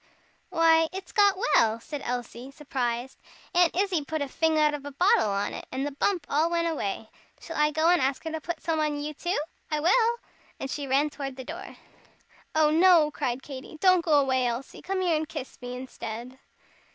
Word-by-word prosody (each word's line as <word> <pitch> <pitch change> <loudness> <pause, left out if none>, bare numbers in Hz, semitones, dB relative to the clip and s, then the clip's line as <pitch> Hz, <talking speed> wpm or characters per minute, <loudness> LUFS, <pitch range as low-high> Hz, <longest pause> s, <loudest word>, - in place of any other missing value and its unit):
"Why, 325 -1 +4
it's 380 +1 -7
got 405 -3 +4
well!" 230 - +3
said 290 +4 -7
Elsie, 245 +1 -5
surprised. 265 -3 -3 0.3
"Aunt 350 -2 +4
Izzie 370 -4 +1
put 310 +1 -2
a - - -4
fing 320 +3 +1
out 300 -1 +4
of 290 -1 -5
a 285 - -6
bottle 280 - +3
on 200 +1 -1
it, - - -7
and 265 +2 -2
the 290 - -3
bump 335 +3 0
all 310 +4 +2
went 340 0 0
away. 220 -8 -3 0.3
Shall 330 - -8
I 300 0 +3
go 315 +2 +1
and 355 0 +4
ask 265 +1 0
her 320 - -4
to 320 0 -4
put 335 0 -5
some 320 -1 0
on 300 -1 0
you 300 +1 -4
too 345 +5 -2 0.3
I 305 - 0
will." 455 +9 +3 0.4
And 270 - -4
she 285 -2 -4
ran 280 +3 +2
toward 275 -3 -6
the 260 - -7
door. 340 +6 -8 0.8
"Oh, 310 -1 +4
no!" 330 -2 +5
cried 250 -2 -3
Katy, 275 +2 -9
"don't 370 -1 +4
go 320 - +1
away, 260 -2 +2
Elsie. 240 +3 -5
Come 380 0 -2
here 350 -3 +2
and 310 0 -2
kiss 260 - -7
me, 245 0 -6
instead." 250 0 -7
300 Hz, 205 wpm, -27 LUFS, 265-330 Hz, 0.8 s, no